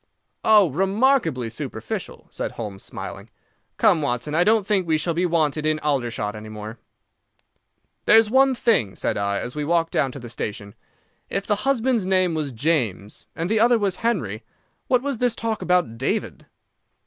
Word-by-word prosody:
"Oh, 210 -7 +5
remarkably 195 - +1
superficial," 115 -4 -6
said - - -4
Holmes, 105 -4 -6
smiling. - - -8 0.5
"Come, 160 - +4
Watson, 145 +1 -2
I 170 +3 +4
don't 215 0 +3
think 195 -4 +1
we 160 -1 +2
shall 170 +2 -1
be 175 +2 +1
wanted 155 -3 +1
in 155 0 +1
Aldershot 120 -8 -2
any 110 0 -9
more." 110 +1 -8 1.3
"There's 225 0 +6
one 265 +3 +4
thing," 175 - +1
said - - -2
I, 100 0 -1
as 125 - -6
we 150 - -2
walked 165 +1 +1
down 135 -3 +1
to 140 - -8
the 120 - -9
station. 105 -3 -6 0.6
"If 195 0 -2
the 210 - +1
husband's 240 -6 +1
name 185 -2 +2
was 155 -3 -2
James, 115 - -1
and 165 - -2
the 220 +2 +1
other 235 +2 +5
was 200 -4 -1
Henry, 160 - -1 0.5
what 250 -1 +2
was 280 -5 -2
this 245 -2 +1
talk 225 -1 -3
about 175 -11 +1
David?" 130 - -2
165 Hz, 170 wpm, -23 LUFS, -, 1.3 s, There's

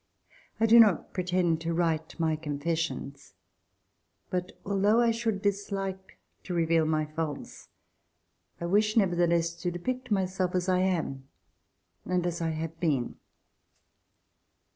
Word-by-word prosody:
I 225 - +4
do 230 +1 +7
not 210 -7 +4
pretend 180 -3 +1
to 165 0 -2
write 165 -1 -1
my 160 -1 +2
confessions, 150 -2 -4 1.0
but 180 0 -2
al 195 -1 -1
though 210 +3 +4
I 235 -1 +4
should 225 -3 -2
dislike 195 -1 -3 0.2
to 180 - -5
reveal 165 -1 +3
my 155 -1 +1
faults, 155 -1 -6 0.9
I 170 - -3
wish 210 +5 +2
nevertheless 170 -4 +2
to 175 - 0
depict 250 +9 -4
myself 185 -2 0
as 180 0 0
I 185 -1 +3
am 165 -8 -1 0.8
and 180 -1 -1
as 170 0 -2
I 165 - 0
have 160 0 -4
been. 145 -8 0
175 Hz, 130 wpm, -28 LUFS, 160-195 Hz, 1.0 s, do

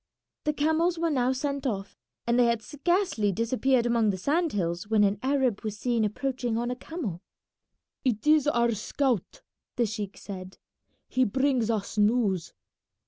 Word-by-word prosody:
The 300 - +2
camels 320 +4 +1
were 335 0 0
now 255 -3 +2
sent 280 +1 -2
off, 195 -4 -4 0.3
and 235 +1 +2
they 245 - +6
had 235 -2 +1
scarcely 305 - 0
disappeared 240 +4 +1
among 235 -2 +2
the 190 - 0
sand 315 - +1
hills 170 -1 -2
when 215 -1 +3
an 200 0 +2
Arab 260 -5 +1
was 215 -1 -4
seen 235 0 0
approaching 245 +2 -1
on 240 +1 -1
a - - -2
camel. 245 - -5 0.8
"It 235 -3 0
is 300 -1 +5
our 235 -4 +3
scout," 235 0 -1 0.3
the 240 - +2
sheik 210 -2 -5
said; 185 -2 -8 0.5
"he 255 - +2
brings 255 0 +1
us 210 -1 -2
news." 205 -5 +2
240 Hz, 160 wpm, -27 LUFS, 210-275 Hz, 0.8 s, they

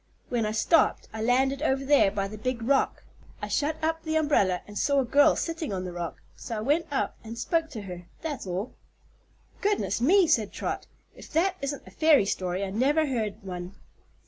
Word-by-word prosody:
When 230 -3 0
I - - -1
stopped 265 +9 +2
I 220 - -4
landed 265 +4 +2
over 270 -3 +1
there 285 -7 +5
by 195 0 -2
the 210 - -8
big 245 0 -2
rock. 270 +3 +1 0.4
I - - -4
shut 300 +1 0
up 325 +1 0
the 315 -1 -3
umbrella 245 - +2
and 210 - -12
saw 280 +4 +2
a - - -2
girl 285 +4 +5
sitting 330 -4 -3
on 185 -2 -3
the 180 -1 -6
rock, 175 -1 -6
so 230 - -6
I - - -3
went 295 +8 +1
up 280 - -1
and 225 +1 -8
spoke 325 +6 0
to 230 -8 -7
her. 180 -2 -8 0.2
That's 295 -10 -4
all." 185 +6 -3 0.9
"Goodness 410 - 0
me!" 365 +9 +5
said 230 -10 +2
Trot; - - -4 0.3
"if - - -13
that 365 +4 +2
isn't 280 0 -4
a - - -13
fairy 310 -9 +4
story 185 -1 -2
I 195 - -3
never 285 +9 +2
heard 220 -6 -3
one." 180 0 -6
255 Hz, 200 wpm, -27 LUFS, 205-305 Hz, 0.9 s, there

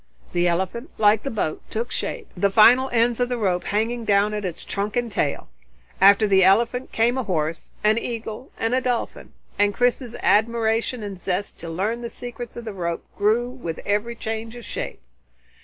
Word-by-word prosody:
The 175 0 +2
elephant, 190 - -1
like 210 0 +4
the 275 - -4
boat, 205 -10 -2
took 235 +3 -3
shape, 470 -4 -4
the 200 +2 +2
final 245 +6 +6
ends 235 0 +2
of 245 0 +1
the 245 - -1
rope 185 -5 0
hanging 230 +3 -1
down 205 0 +3
at 210 -1 -3
its 175 -3 -4
trunk 205 +1 -3
and 240 -2 -1
tail. 145 - -1 0.5
After 200 +2 +7
the 190 -1 +5
elephant 235 +7 +3
came 240 +3 +2
a - - -1
horse, 160 -5 -2
an 215 +2 +4
eagle, 230 +1 -6
and 225 +2 -1
a 260 - +2
dolphin, 245 -2 -3 0.3
and 205 0 +3
Chris's 245 -1 0
admiration 225 +2 +2
and 200 -3 -6
zest 190 +3 -3
to 165 - -7
learn 205 +8 -2
the 235 - -4
secrets 240 -1 -8
of 235 - -7
the 220 - -5
rope 170 -3 -3
grew 220 +4 +2
with 245 -11 -6
every 210 +3 0
change 225 0 -5
of 240 - -9
shape. - - -5
220 Hz, 190 wpm, -23 LUFS, 200-240 Hz, 0.5 s, After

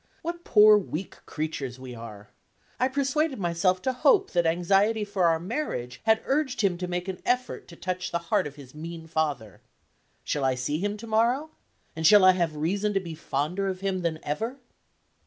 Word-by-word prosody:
What 345 +1 -4
poor 210 -1 +7
weak 185 -1 -6
creatures 140 -5 -4
we 130 -1 -8
are! 105 -3 -10 0.5
I 255 - +3
persuaded 280 +2 0
myself 180 0 0
to 260 - 0
hope 390 - +3
that 175 -2 +2
anxiety 195 +6 +2
for 200 -3 0
our 165 -1 +3
marriage 170 - -4
had 220 0 +3
urged 270 -3 0
him 195 -4 +2
to 180 - -3
make 180 +1 -3
an 190 -1 -5
effort 250 0 -1
to 170 - -12
touch 180 0 -3
the 170 - 0 0.2
heart - - +3
of 145 - -10
his 135 -3 -13
mean 165 +1 -8
father. 145 - -2 0.6
Shall 145 - -2
I 130 -1 +2
see 135 +5 -2
him 205 +2 -2
to 225 - -9
morrow? 235 +7 +1 0.4
And 160 0 +2
shall 205 +1 +7
I 185 - +9
have 170 -4 -1
reason 195 +7 -1
to - - +4
be 170 -3 -7
fonder 160 +5 -2
of 185 -1 -3
him 195 -1 -1
than 165 -2 -1
ever? 225 - -3
185 Hz, 195 wpm, -26 LUFS, 155-220 Hz, 0.6 s, I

